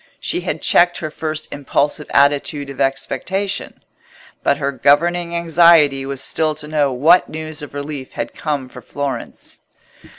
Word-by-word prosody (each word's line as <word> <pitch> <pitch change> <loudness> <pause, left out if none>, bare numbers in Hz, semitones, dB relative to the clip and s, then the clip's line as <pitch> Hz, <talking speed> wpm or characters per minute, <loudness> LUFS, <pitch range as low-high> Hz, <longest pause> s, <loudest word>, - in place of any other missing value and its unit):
She - - -2
had - - -4
checked 175 0 +4
her 155 -2 -5
first 155 0 -4
impulsive 145 +1 -1
attitude 140 0 +1
of 140 - -6
expectation; 190 +8 -2 0.6
but 140 - +2
her 140 -1 -1
governing 170 +6 +2
anxiety 165 -5 +4
was 135 -1 -3
still 155 +1 0
to 150 0 -4
know 150 -3 +1
what 155 +8 +4
news 155 0 -6
of 145 -1 -9
relief 145 -2 -6
had - - -4
come 145 -4 -3
for 125 - -12
Florence. 140 +3 -6
150 Hz, 145 wpm, -18 LUFS, 140-160 Hz, 0.6 s, checked